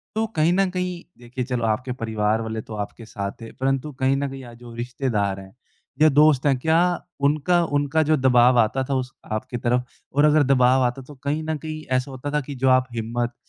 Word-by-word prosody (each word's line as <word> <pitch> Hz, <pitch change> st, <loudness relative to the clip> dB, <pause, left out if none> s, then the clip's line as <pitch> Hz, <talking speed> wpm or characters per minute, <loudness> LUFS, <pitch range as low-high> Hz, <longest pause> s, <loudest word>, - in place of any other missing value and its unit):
तो 220 Hz, +1 st, +1 dB
कहीं 160 Hz, +2 st, +3 dB
न 195 Hz, +1 st, +2 dB
कहीं 180 Hz, -1 st, -3 dB, 0.2 s
देखिए 125 Hz, +1 st, -5 dB
चलो 125 Hz, -2 st, -2 dB
आपके 115 Hz, +4 st, -1 dB
परिवार 110 Hz, -2 st, -1 dB
वाले 110 Hz, 0 st, -4 dB
तो 110 Hz, -, -9 dB
आपके 105 Hz, +2 st, -6 dB
साथ 100 Hz, -2 st, -4 dB
थे, 115 Hz, -, -9 dB
परंतु 135 Hz, +2 st, -1 dB
कहीं 130 Hz, +1 st, +2 dB
न 140 Hz, 0 st, -2 dB
कहीं 135 Hz, 0 st, -8 dB
आज 120 Hz, -1 st, -12 dB
जो 120 Hz, -1 st, -11 dB
रिश्तेदार 120 Hz, -5 st, -2 dB
हैं 95 Hz, 0 st, -13 dB, 0.5 s
या 155 Hz, -, +7 dB
दोस्त 150 Hz, -1 st, +4 dB
हैं, 140 Hz, -2 st, +3 dB
क्या 160 Hz, +4 st, +3 dB, 0.5 s
उनका 160 Hz, +4 st, +2 dB
उनका 145 Hz, +1 st, +1 dB
जो 155 Hz, 0 st, +2 dB
दबाव 125 Hz, -2 st, +5 dB
आता 120 Hz, +4 st, +2 dB
था 135 Hz, -, +1 dB
उस 130 Hz, 0 st, -3 dB, 0.2 s
आपकी 110 Hz, +3 st, -3 dB
तरफ 125 Hz, +1 st, 0 dB, 0.3 s
और 145 Hz, +2 st, +4 dB
अगर 150 Hz, 0 st, +5 dB
दबाव 130 Hz, -1 st, +4 dB
आता 125 Hz, +2 st, -1 dB
तो 145 Hz, -, -11 dB
कहीं 150 Hz, +3 st, -1 dB
न 160 Hz, -, 0 dB
कहीं 155 Hz, +1 st, -7 dB
ऐसा 130 Hz, +2 st, 0 dB
होता 135 Hz, +2 st, -5 dB
था 150 Hz, -, +1 dB
कि 140 Hz, +1 st, -8 dB
जो 130 Hz, +1 st, +1 dB
आप 130 Hz, 0 st, +4 dB
हिम्मत, 120 Hz, +2 st, -2 dB
130 Hz, 220 wpm, -23 LUFS, 120-150 Hz, 0.5 s, या